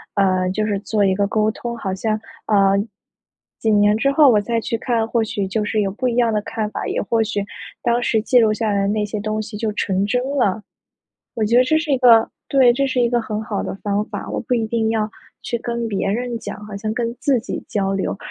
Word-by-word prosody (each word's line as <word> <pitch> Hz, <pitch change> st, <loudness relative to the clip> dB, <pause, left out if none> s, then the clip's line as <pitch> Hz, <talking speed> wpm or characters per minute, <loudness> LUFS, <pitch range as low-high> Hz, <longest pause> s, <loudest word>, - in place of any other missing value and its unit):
呃， 185 Hz, -2 st, +2 dB
就 215 Hz, +3 st, -1 dB
是 205 Hz, -2 st, 0 dB
做 205 Hz, +1 st, 0 dB
一 190 Hz, -1 st, +2 dB
个 200 Hz, +1 st, +1 dB
沟 215 Hz, +1 st, +1 dB
通， 235 Hz, +1 st, -6 dB
好 190 Hz, -4 st, -3 dB
像， 215 Hz, +2 st, -1 dB, 0.3 s
呃， 195 Hz, -2 st, +4 dB, 0.8 s
几 220 Hz, -, 0 dB
年 205 Hz, 0 st, +4 dB
之 275 Hz, +6 st, +2 dB
后 295 Hz, +1 st, +6 dB
我 215 Hz, -4 st, +4 dB
再 230 Hz, +3 st, -1 dB
去 230 Hz, +1 st, -2 dB
看 225 Hz, -1 st, 0 dB
或 230 Hz, 0 st, +1 dB
许 205 Hz, -2 st, -2 dB
就 210 Hz, +3 st, -1 dB
是 215 Hz, +1 st, -1 dB
有 200 Hz, -2 st, +1 dB
不 255 Hz, +6 st, -1 dB
一 235 Hz, -, -2 dB
样 235 Hz, -2 st, +3 dB
的 210 Hz, -, +1 dB
看 215 Hz, 0 st, -3 dB
法， -, -, -4 dB
也 -, -, -1 dB
或 225 Hz, +2 st, +1 dB
许 205 Hz, -2 st, -2 dB, 0.4 s
当 240 Hz, 0 st, +1 dB
时 220 Hz, -2 st, +2 dB
记 250 Hz, +3 st, +2 dB
录 220 Hz, -2 st, +5 dB
下 220 Hz, 0 st, -1 dB
来 200 Hz, -, +1 dB
的 195 Hz, -, +1 dB
那 210 Hz, 0 st, 0 dB
些 210 Hz, +1 st, -4 dB
东 215 Hz, +1 st, -2 dB
西 215 Hz, 0 st, -8 dB
就 220 Hz, 0 st, -1 dB
成 195 Hz, -2 st, 0 dB
真 245 Hz, +4 st, 0 dB, 0.2 s
了。 210 Hz, -3 st, +1 dB, 0.7 s
我 220 Hz, -, 0 dB
觉 225 Hz, +3 st, +2 dB
得 250 Hz, -, +7 dB
这 315 Hz, +5 st, +2 dB
是 315 Hz, -1 st, -2 dB
一 270 Hz, -, +3 dB
个 230 Hz, -3 st, +6 dB, 0.2 s
对， 260 Hz, -3 st, +5 dB
这 275 Hz, +2 st, +1 dB
是 260 Hz, -1 st, -1 dB
一 240 Hz, -, +4 dB
个 240 Hz, -, +2 dB
很 215 Hz, -1 st, -4 dB
好 210 Hz, -2 st, -3 dB
的 -, -, -4 dB
方 205 Hz, 0 st, 0 dB
法， -, -, -6 dB
我 -, -, -2 dB
不 245 Hz, -, -1 dB
一 225 Hz, -2 st, 0 dB
定 220 Hz, 0 st, 0 dB
要 220 Hz, -1 st, 0 dB, 0.4 s
去 -, -, -2 dB
跟 235 Hz, -1 st, -3 dB
别 200 Hz, -2 st, -1 dB
人 240 Hz, +2 st, -2 dB
讲 210 Hz, -, -7 dB
好 210 Hz, -1 st, -8 dB
像 215 Hz, +2 st, -3 dB
跟 235 Hz, 0 st, -2 dB
自 270 Hz, -4 st, +2 dB
己 225 Hz, -, -6 dB
交 195 Hz, -2 st, 0 dB
流。 195 Hz, 0 st, -2 dB
220 Hz, 270 characters per minute, -20 LUFS, 205-235 Hz, 0.8 s, 得